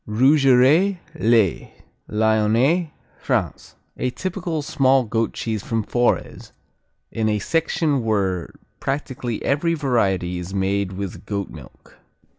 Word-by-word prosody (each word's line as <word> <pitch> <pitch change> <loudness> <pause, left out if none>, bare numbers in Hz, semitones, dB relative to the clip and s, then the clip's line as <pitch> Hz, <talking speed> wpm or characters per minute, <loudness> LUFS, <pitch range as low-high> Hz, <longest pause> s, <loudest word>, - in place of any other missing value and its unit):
Rougerets, 135 - +4 0.2
les 115 - +1 0.4
Lyonnais, 110 +10 +2 0.3
France - - -2 0.2
A 125 - -1
typical 175 0 -4
small 135 -2 +3
goat 115 0 -1
cheese 110 -3 -3
from 115 0 -2
Forez, 120 +3 -1 0.6
in 110 -1 0
a 105 - +1
section 155 - 0
where 95 -5 -1 0.3
practically 130 -4 -3
every 165 +4 +1
variety 95 - 0
is 90 +2 -6
made 95 0 0
with 95 -1 -6
goat 100 -2 -3
milk. 75 -5 -15
115 Hz, 110 wpm, -22 LUFS, 100-140 Hz, 0.6 s, Rougerets